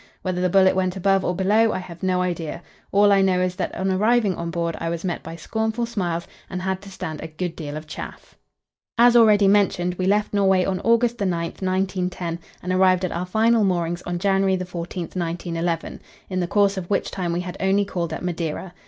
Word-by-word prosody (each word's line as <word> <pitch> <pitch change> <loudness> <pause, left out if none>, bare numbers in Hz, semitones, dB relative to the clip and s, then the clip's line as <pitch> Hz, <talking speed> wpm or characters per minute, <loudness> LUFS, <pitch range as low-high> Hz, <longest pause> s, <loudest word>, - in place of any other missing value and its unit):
Whether 185 -1 -1
the 180 - +2
bullet 190 +1 +5
went 185 -1 0
above 195 0 +2
or 180 - -1
below, 210 +4 +3
I - - -1
have 175 -2 -9
no 185 -1 +1
idea. 170 -2 -4 0.3
All 205 +1 +5
I 195 -1 +5
know 190 -1 +3
is, 180 0 0
that 185 - -3
on 190 0 -1
arriving 210 +1 +2
on 170 -1 -4
board 170 0 -2
I 165 - -2
was 170 +2 -4
met 175 - -2
by 165 - -8
scornful 220 +6 -2
smiles 175 -7 -3 0.2
and 185 - -4
had 190 0 -2
to 200 - -11
stand 180 -5 -6
a 160 - -5
good 165 +2 -5
deal 150 -2 -6
of 155 - -8
chaff. 155 - -9 0.6
As 240 +1 +6
already 210 -4 +6
mentioned, 190 -3 +2
we 185 - 0
left 210 +2 +1
Norway 190 -2 +3
on 190 -1 -1
August 235 +2 +2
9, 200 -2 +1
1910, 180 0 -2 0.2
and 180 +1 -1
arrived 185 0 +4
at 180 - -3
our 175 +2 -3
final 220 +3 +3
moorings 175 -2 0
on 175 0 -3
January 195 0 +2
14, 180 -1 -5
1911, 170 -1 -3 0.3
in 185 - -1
the 175 - 0
course 200 +1 +2
of 175 -2 -5
which 205 - 0
time 180 -3 -2
we 175 +1 -1
had 180 -1 -6
only 195 +1 +2
called 170 -4 -3
at 160 - -5
Madeira. 175 0 -3
185 Hz, 215 wpm, -23 LUFS, 175-195 Hz, 0.6 s, As